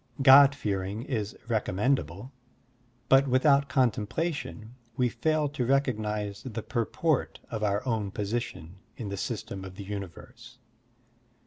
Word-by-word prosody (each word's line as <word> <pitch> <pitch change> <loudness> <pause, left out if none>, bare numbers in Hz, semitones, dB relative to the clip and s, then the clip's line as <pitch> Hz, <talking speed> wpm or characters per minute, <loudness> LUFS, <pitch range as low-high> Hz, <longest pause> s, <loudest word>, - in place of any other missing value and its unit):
God 140 +1 +8
fearing 100 -2 -3
is 110 -6 -3
recom 110 -5 -1
mendable, 115 - -1 0.8
but 135 +1 +5
without 140 +2 +3
contemplation 125 -1 -1 0.2
we 125 -2 +2
fail 155 +6 0
to 135 -3 -3
recognize 105 -6 0
the 115 -4 -6
purport 130 +5 -1
of 110 - -3
our 105 +3 0
own 110 -5 -1
position 100 -5 -4 0.2
in 110 -4 -5
the 100 - -3
system 105 -2 -5
of 95 -1 -9
the 100 - -8
tmiverse. 105 +5 -8
115 Hz, 125 wpm, -28 LUFS, 100-135 Hz, 0.8 s, God